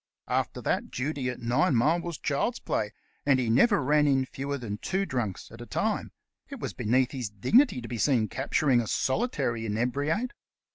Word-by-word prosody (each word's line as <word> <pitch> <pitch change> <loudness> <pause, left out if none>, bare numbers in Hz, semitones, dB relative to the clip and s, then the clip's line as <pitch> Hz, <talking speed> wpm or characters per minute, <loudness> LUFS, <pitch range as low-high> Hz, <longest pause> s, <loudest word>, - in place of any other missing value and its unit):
After - - -1
that, - - 0
duty 135 0 -2
at 125 - -6
Ninemile 140 +5 +2
was 170 -2 -5
child's 150 - -1
play, 105 -1 -2 0.3
and 135 -2 +3
he 120 -3 +1
never 170 - +4
ran 150 +2 +3
in 135 -2 +3
fewer 140 +2 -4
than 105 -5 -5
two 190 +8 -1
drunks 120 - -3
at - - -11
a - - -8
time; - - -1 0.4
it - - -7
was - - -4
beneath 125 +4 +1
his 125 -6 -4
dignity 170 - +3
to 115 - -7
be 120 -1 -5
seen 120 -5 +3
capturing 135 -1 +1
a 115 - -5
solitary 130 - 0
inebriate. 140 - -1
130 Hz, 180 wpm, -28 LUFS, 120-150 Hz, 0.4 s, never